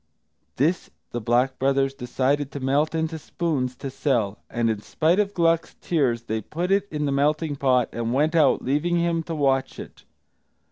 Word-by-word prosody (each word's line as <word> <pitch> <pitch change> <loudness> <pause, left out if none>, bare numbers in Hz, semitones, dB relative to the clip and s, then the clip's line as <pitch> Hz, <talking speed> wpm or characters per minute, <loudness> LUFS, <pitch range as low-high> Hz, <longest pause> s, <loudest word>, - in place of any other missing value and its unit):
This 165 +7 0 0.2
the 120 - -3
Black 125 +4 +1
Brothers 135 0 +2
decided 135 +3 -1
to 140 - -4
melt 140 +4 +1
into 160 0 -2
spoons, 140 -6 -2
to 135 +1 -6
sell; 115 -8 0
and 120 -1 0
in 110 -2 -1
spite 165 - +1
of 205 -1 0
Gluck's 165 -2 +1
tears, 130 -9 0
they 110 -1 -3
put 175 - -3
it 200 0 +2
in 150 -1 -2
the 140 - 0
melting 150 +2 +1
pot, 130 -3 +2
and 115 0 -2
went 150 +5 +2
out, 155 -5 +3
leaving 150 +6 +1
him 170 -1 +1
to 165 0 -5
watch 135 -2 +1
it. - - -11
140 Hz, 180 wpm, -24 LUFS, 130-160 Hz, 0.2 s, out